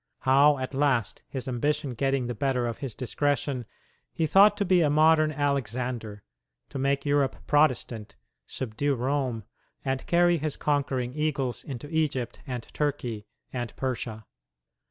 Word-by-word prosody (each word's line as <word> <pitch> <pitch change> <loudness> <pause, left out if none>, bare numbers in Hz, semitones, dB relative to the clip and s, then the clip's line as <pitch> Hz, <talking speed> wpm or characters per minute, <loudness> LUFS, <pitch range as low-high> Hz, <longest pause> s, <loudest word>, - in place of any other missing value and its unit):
How, 140 +2 +5
at 130 +1 -4
last, 135 -6 +1
his 130 -2 -5
ambition 145 +3 -1
getting 135 +1 0
the 120 - -3
better 125 +1 0
of 115 -1 -4
his 135 -6 -5
discretion, 135 -1 -1 0.4
he 165 - 0
thought 200 +6 +6
to 205 - 0
be 180 -1 +4
a 155 - +3
modern 155 +1 +4
Alexander, 125 -6 -2 0.5
to 135 - -5
make 140 +1 0
Europe 145 -2 +2
Protestant, 130 -7 +1 0.3
subdue 135 +3 -2
Rome, 130 -2 -1 0.4
and 135 -1 -1
carry 175 0 +4
his 150 0 -2
conquering 135 -4 0
eagles 145 -4 -1
into 135 0 -7
Egypt 135 -7 -1
and 125 -3 -4
Turkey 125 -8 -2 0.3
and 120 -3 -4
Persia. 115 -4 -4
135 Hz, 140 wpm, -27 LUFS, 125-145 Hz, 0.5 s, thought